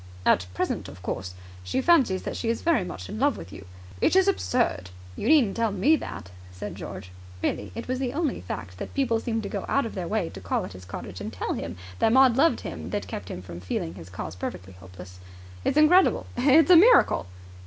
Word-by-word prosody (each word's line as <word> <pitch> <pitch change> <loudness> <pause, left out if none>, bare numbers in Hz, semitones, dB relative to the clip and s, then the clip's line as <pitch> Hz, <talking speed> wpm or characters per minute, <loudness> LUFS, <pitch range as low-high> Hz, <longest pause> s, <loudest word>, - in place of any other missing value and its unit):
"At 90 - +3
present, - - -2
of 90 +4 -13
course, 90 0 -4 0.3
she 90 - -1
fancies 265 - +3
that - - -4
she 230 - -2
is 230 - -1
very 330 - +3
much 180 - -7
in 215 - -6
love 280 0 +2
with 95 - -10
you... 95 - -11 0.3
It - - +3
is 380 0 +5
absurd!" 240 - 0 0.3
"You - - -4
needn't 275 -10 +4
tell 230 -2 +1
me 205 +11 +3
that," 90 - -7 0.2
said 90 - -7
George. 95 -1 -8 0.3
Really, 100 -2 -2
it - - -6
was 255 +1 -2
only 275 +3 -1
the - - -9
fact 90 +1 -7
that - - -7
people 245 -5 +1
seemed 225 -1 -2
to - - -3
go 200 - -4
out 275 - +1
of 225 - -6
their 180 -3 -4
way 210 -4 -1
to 95 - -10
call 90 - -1
at 100 - -9
his 90 -1 -11
cottage 85 - -8
and - - -5
tell - - -3
him 85 +2 -5 0.2
that 220 - +3
Maud 260 -1 +6
loved 320 +5 +3
him 80 -1 -6
that - - -3
kept 100 -1 -6
him 90 - -6
from 85 -1 -9
feeling 85 -2 -3
his 90 -1 -11
cause 90 -2 -6
perfectly 90 +1 -6
hopeless. 90 0 -13 0.4
"It's - - 0
incredible. 340 +5 +5
It's 290 +7 +5
a 350 - +10
miracle." 445 - +5
195 Hz, 225 wpm, -26 LUFS, -, 0.4 s, a